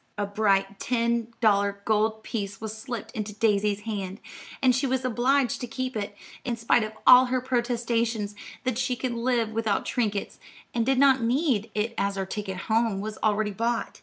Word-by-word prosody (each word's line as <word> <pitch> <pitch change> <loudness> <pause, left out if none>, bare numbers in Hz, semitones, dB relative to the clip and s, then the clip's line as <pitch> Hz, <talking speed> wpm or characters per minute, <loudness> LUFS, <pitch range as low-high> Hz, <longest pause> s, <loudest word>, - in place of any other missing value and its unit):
A 205 - 0
bright 200 -1 +1
ten 235 -1 0
dollar 200 -2 +2
gold 220 0 +1
piece 200 -3 -4
was 220 -1 -5
slipped 230 -1 -6
into 210 -1 -5
Daisy's 210 -2 +1
hand, 205 -2 -4 0.4
and 255 -2 +4
she 270 +2 +1
was 260 0 -1
obliged 255 +1 +1
to 245 - -3
keep 255 +2 -4
it, 205 -1 -4 0.3
in 240 -2 -2
spite 230 +1 +3
of 215 0 -5
all 250 +1 +9
her 255 0 0
protestations 235 -4 -1 0.3
that 255 -2 -1
she 255 - 0
could 250 0 -3
live 235 -1 0
without 220 -2 0
trinkets, 210 -5 -2 0.3
and 235 0 0
did 265 -1 +3
not 270 -1 +5
need 235 -2 +1
it 215 +2 -1
as 200 0 0
her 195 -1 -2
ticket 190 -1 -5
home 225 -2 +1
was 215 +1 -5
already 215 0 +1
bought. 230 +3 -2
225 Hz, 180 wpm, -26 LUFS, 210-245 Hz, 0.4 s, all